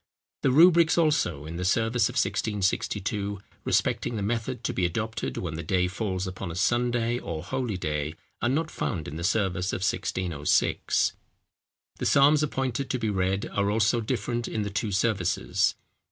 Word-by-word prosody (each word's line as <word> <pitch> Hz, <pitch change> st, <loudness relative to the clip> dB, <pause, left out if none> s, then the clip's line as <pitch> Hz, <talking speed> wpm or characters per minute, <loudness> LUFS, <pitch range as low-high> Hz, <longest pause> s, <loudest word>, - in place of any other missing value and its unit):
The -, -, +3 dB
rubrics, 165 Hz, +4 st, +6 dB
also, 145 Hz, -, +1 dB
in 80 Hz, +2 st, -6 dB
the 90 Hz, -, -3 dB
service 115 Hz, +4 st, +2 dB
of -, -, -7 dB
1662, 100 Hz, 0 st, -1 dB, 0.2 s
respecting 120 Hz, -, 0 dB
the 105 Hz, -, -2 dB
method 115 Hz, +3 st, -2 dB
to -, -, -1 dB
be 90 Hz, -, -1 dB
adopted 110 Hz, +6 st, -2 dB
when 85 Hz, -3 st, -3 dB
the 80 Hz, -, -4 dB
day 90 Hz, -1 st, +1 dB
falls 95 Hz, -1 st, -2 dB
upon 95 Hz, 0 st, -5 dB
a 85 Hz, -, -6 dB
Sunday 120 Hz, +4 st, +1 dB
or 80 Hz, -7 st, -5 dB
holy 125 Hz, -2 st, -2 dB
day, 75 Hz, -2 st, -2 dB, 0.3 s
are 120 Hz, -, +2 dB
not 155 Hz, +4 st, 0 dB
found 85 Hz, -8 st, -3 dB
in 75 Hz, -, -6 dB
the 85 Hz, -, -5 dB
service 95 Hz, -1 st, +1 dB
of -, -, -3 dB
1606. 85 Hz, -8 st, +1 dB, 0.8 s
The -, -, -3 dB
psalms 145 Hz, +2 st, +5 dB
appointed 135 Hz, -3 st, -1 dB
to 130 Hz, -, 0 dB
be 110 Hz, -3 st, -1 dB
read 95 Hz, 0 st, 0 dB
are 100 Hz, 0 st, +1 dB
also 110 Hz, +2 st, +2 dB
different 120 Hz, 0 st, -2 dB
in 110 Hz, -, -2 dB
the 100 Hz, -, -4 dB
two 105 Hz, +1 st, -2 dB
services. 95 Hz, -3 st, +1 dB
105 Hz, 170 wpm, -27 LUFS, 90-120 Hz, 0.8 s, rubrics